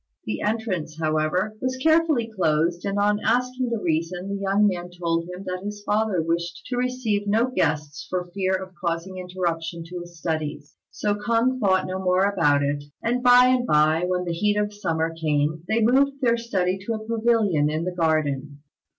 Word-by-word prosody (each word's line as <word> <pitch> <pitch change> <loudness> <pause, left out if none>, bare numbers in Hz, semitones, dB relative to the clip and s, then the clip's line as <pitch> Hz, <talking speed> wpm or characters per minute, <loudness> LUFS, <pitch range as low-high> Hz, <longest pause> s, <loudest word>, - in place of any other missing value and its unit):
The 105 - -3
entrance, 205 -8 -2
however, 155 +6 0
was 255 0 -1
carefully 315 -3 +3
closed; 170 -4 0
and 200 0 -1
on 205 0 +2
asking 250 +1 +1
the 235 - -1
reason, 175 +2 -2
the 200 0 -3
young 200 +2 +3
man 180 -3 -1
told 170 -1 -2
him 180 +2 -7
that 185 -1 -4
his 205 0 -6
father 210 -5 +1
wished 170 +1 -2
to 250 - -1
receive 245 -5 -1
no 225 +5 +2
guests 150 - -1
for 180 -1 -2
fear 190 -1 +1
of 185 0 -6
causing 170 +2 -2
interruption 170 -2 -3
to 180 +1 -7
his 175 0 -11
studies. 155 -2 -4
So 210 - -1
K'ung 235 +4 +1
thought 190 -4 +2
no 185 0 -4
more 185 0 +2
about 155 -8 +2
it; 145 0 -1 0.2
and 245 +2 0
by 250 0 +7
and 250 -1 +2
by, 155 +1 +3
when 180 0 -1
the 170 - -2
heat 205 +4 +1
of 210 0 0
summer 165 -5 -1
came 150 -3 +1
on, 160 0 -12
they 220 +3 +1
moved 270 +5 +4
their 240 -3 +3
study 195 -5 -1
to 230 - 0
a 215 0 -7
pavilion 220 -9 +2
in 155 +2 -2
the 180 +1 -3
garden. 150 -4 -1
185 Hz, 190 wpm, -24 LUFS, 165-220 Hz, 0.2 s, by